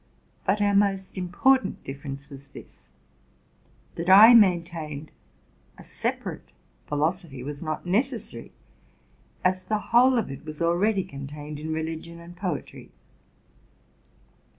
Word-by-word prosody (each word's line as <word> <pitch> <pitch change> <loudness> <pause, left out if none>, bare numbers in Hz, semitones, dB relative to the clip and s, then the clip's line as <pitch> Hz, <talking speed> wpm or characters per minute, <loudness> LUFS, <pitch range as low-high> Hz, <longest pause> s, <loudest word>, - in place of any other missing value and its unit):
But 205 +2 +2
our 205 0 +2
most 195 -1 +1
important 225 +9 +1
difference 140 0 -7
was 140 -1 -11
this: - - -14 1.1
that 170 +2 -4
I 210 +5 +10
maintained 170 -8 +2 0.7
a - - -12
separate - - -4 0.4
philosophy 150 -2 -2
was 145 +1 -6
not 155 0 -4
ne 190 +6 +3
cessary, 260 -4 -8 1.0
as 185 0 +2
the 215 - -1 0.2
whole 250 +2 +6
of 225 - -1
it 135 +2 -9
was 155 -1 -8
already 185 +4 +2
contained 145 -2 -8
in 160 +1 -5
religion 160 +1 -5
and 170 +1 -12
poetry. 175 -4 -5
170 Hz, 120 wpm, -26 LUFS, 150-195 Hz, 1.1 s, I